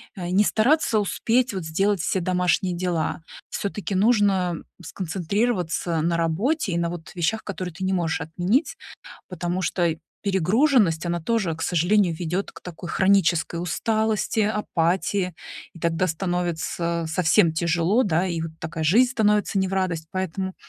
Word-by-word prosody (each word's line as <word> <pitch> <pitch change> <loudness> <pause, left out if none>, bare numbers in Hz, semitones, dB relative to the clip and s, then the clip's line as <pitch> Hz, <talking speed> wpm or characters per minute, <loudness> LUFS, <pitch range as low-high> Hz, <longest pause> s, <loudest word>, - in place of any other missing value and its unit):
а, 175 -3 -5
не 195 +3 +4
стараться 230 0 +3
успеть, 235 +4 +1
вот, 185 -4 -4
сделать 195 +5 +1
все 185 +3 0
домашние 180 0 +1
дела. 170 -2 -2 0.3
Всё-таки 200 -1 -4
нужно 195 -4 +3 0.3
сконцентрироваться 180 -1 -1
на 170 +2 +1
работе 190 - 0
и 170 - 0
на, 170 0 0
вот, 170 -2 -8
вещах, 185 +6 -1
которые 185 -3 -5
ты 190 +3 -7
не 190 - 0
можешь 175 -4 0
отменить, 180 - 0 0.5
потому 180 0 -3
что 175 -1 +1 0.3
перегруженность, 195 - +2
она 170 0 -1
тоже, 195 -2 0
к 165 - -9
сожалению, 175 +2 +2
ведёт 175 +4 -3
к - - -13
такой 175 -1 -8
хронической 175 -4 +2
усталости, 220 +5 0
апатии, 190 -3 0 0.4
и 170 - -13
тогда 170 +2 0
становится 170 -1 -2
совсем 160 0 +3
тяжело, 170 +7 +2
да, 175 -3 +1
и 170 -2 -2
вот 165 0 -4
такая 160 0 -3
жизнь 240 +10 +4
становится 210 -3 +2
не 190 - +1
в 190 - -5
радость. 180 -4 -1
Поэтому 190 0 -3
180 Hz, 150 wpm, -24 LUFS, 170-205 Hz, 0.5 s, не